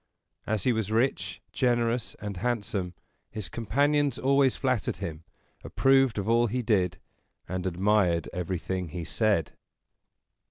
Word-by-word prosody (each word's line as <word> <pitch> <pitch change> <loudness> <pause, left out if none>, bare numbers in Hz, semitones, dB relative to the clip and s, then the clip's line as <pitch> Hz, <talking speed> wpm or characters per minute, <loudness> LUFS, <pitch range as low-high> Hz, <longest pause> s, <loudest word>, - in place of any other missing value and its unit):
As 110 -3 0
he 125 - +3
was 110 -2 -2
rich, 110 -6 0
generous, 120 -1 +1
and 105 -3 -6
handsome, 100 -5 -2 0.3
his 105 -5 -5
companions 140 +4 +1
always 135 -1 +3
flattered 130 -6 -1
him, 80 0 -6 0.4
approved 135 -3 +3
of 100 0 -2
all 120 +1 +4
he 125 +3 -2
did, 95 -6 +1 0.5
and 95 +1 -3
admired 90 -2 +2
everything 90 +1 -3
he 85 +2 -5
said. 105 -3 +1
110 Hz, 125 wpm, -28 LUFS, 90-125 Hz, 0.5 s, all